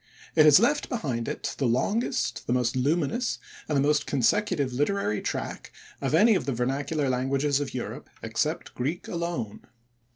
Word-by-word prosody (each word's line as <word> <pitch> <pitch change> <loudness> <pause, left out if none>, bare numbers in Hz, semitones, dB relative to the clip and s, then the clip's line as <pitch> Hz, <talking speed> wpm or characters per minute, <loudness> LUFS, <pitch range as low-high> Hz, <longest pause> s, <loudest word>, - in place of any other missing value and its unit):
It 155 -1 +7
has 150 +1 +8
left 285 +7 +2
behind 130 - -2
it - - -3
the 135 - +2
longest, 200 - 0
the 120 - +1
most 125 -1 +1
luminous, 150 - 0 0.3
and 150 - +2
the - - +3
most 150 0 +2
consecutive 145 - +1
literary 145 - 0
track - - -4 0.3
of - - +1
any 220 +7 +6
of 185 - -1
the 135 - 0
vernacular 140 +4 -1
languages 135 +2 +1
of 140 -3 -4
Europe, 125 - -5
except - - -2
Greek 145 +8 -3
alone. 170 - -3
145 Hz, 160 wpm, -27 LUFS, 130-170 Hz, 0.3 s, has